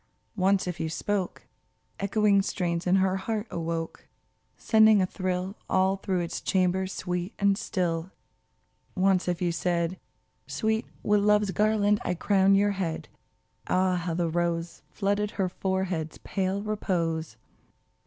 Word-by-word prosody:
Once 195 0 +2
if 180 -1 -4
you 160 - -1
spoke, 195 +3 -2 0.5
Echoing 200 0 +3
strains 175 -2 -2
in 180 - +4
her 190 0 +2
heart 215 +2 -3
awoke, 165 -1 -4 0.5
Sending 220 -2 +5
a 185 - +3
thrill 185 +1 -3
All 190 +1 +2
through 190 -2 -1
its 170 - -4
chambers 190 0 +1
sweet 180 0 -3
and 200 -1 +3
still. 175 -3 -2 0.9
Once 190 -1 +2
if 180 0 -1
you 175 - +1
said, 170 +2 -1 0.5
Sweet, 220 0 -1 0.2
with 210 0 +3
Love's 210 -1 +3
garland 210 0 +2
I 180 - -1
crown 195 +2 +3
your 205 +1 +3
head," 170 -5 -3 0.6
Ah! 185 0 +2
how 175 -1 -2
the 170 0 0
rose 170 0 -2
Flooded 205 +1 0
her 190 -2 +1
forehead's 190 -4 -2
pale 195 +1 -1
repose 165 - -2
185 Hz, 135 wpm, -27 LUFS, 175-200 Hz, 0.9 s, Sending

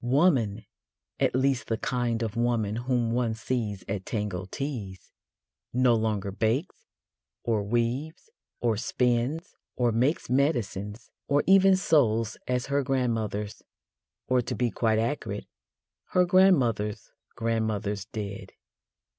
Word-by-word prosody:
Woman 125 - +2 0.5
at - - +2
least 130 -1 +1
the 115 - 0
kind 120 -1 -1
of 110 -1 -3
woman 115 -3 0
whom 120 -1 0
one 120 -2 0
sees 110 -5 -3
at 100 -1 -3
Tango 100 -4 -3
Teas 110 - -5 0.6
no 125 0 +4
longer 110 -3 0
bakes, 115 - -1 0.6
or 115 -3 +1
weaves, 120 - -2 0.3
or 115 -3 +1
spins, 125 +7 0 0.2
or 120 -2 +2
makes 130 +8 +1
medicines, 120 -6 -1 0.2
or 145 +1 +3
even 195 0 +6
sews 115 - +2
as 125 0 0
her 140 0 +1
grandmothers 115 -6 -1 0.7
or, 130 -1 +3
to - - -4
be 120 -2 0
quite 110 -2 +1
accurate, 110 -3 -2 0.7
her 180 0 +5
grandmothers' 135 - +3 0.2
grandmothers 110 -3 -1
did. 105 -2 -6
115 Hz, 120 wpm, -27 LUFS, 110-130 Hz, 0.7 s, even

